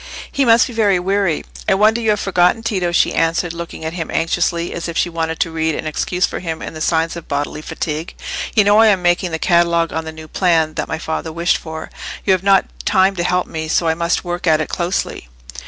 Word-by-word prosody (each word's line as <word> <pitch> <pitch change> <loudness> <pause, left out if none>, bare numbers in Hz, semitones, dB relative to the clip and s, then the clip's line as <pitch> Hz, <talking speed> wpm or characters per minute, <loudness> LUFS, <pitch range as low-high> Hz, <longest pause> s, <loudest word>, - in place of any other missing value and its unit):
He 275 - +1
must 230 -1 +6
be 245 - -7
very 210 -4 +3
weary. 190 -2 0 0.3
"I 195 - +4
wonder 215 +4 +3
you 220 - 0
have 210 -1 +2
forgotten, 185 +3 +2
Tito," 185 -6 -1
she 170 - +2
answered, 165 +1 0
looking 170 -1 -7
at 160 - -3
him 165 -2 -4
anxiously, 170 +1 0
as 170 - -4
if 170 - -4
she - - +1
wanted 165 -1 -2
to 165 - 0
read 160 -1 -1
an - - -5
excuse 175 +4 0
for - - -5
him 165 -3 -4
in - - -7
the 155 - -8
signs 165 +1 +1
of 170 - -9
bodily 145 +1 -3
fatigue. 155 +1 -4 0.4
"You 215 - +6
know 205 +1 +5
I 225 - +7
am 195 -4 +3
making 175 +1 +2
the 160 - -2
catalogue 170 -1 +2
on 160 - -2
the 160 - -5
new 160 0 -11
plan 165 -3 +1
that - - -3
my 160 - -3
father 160 0 -4
wished 170 +2 +1
for; 160 -1 -8 0.3
you 195 - +4
have 185 - +1
not 195 0 +4 0.2
time 190 +1 +3
to 175 - 0
help 180 0 +1
me, 160 0 -5
so 165 +1 +1
I 160 - +3
must 170 +1 -1
work 175 0 -4
at 155 -1 +4
it 155 - -2
closely." 175 - -2
170 Hz, 240 wpm, -18 LUFS, 160-190 Hz, 0.4 s, I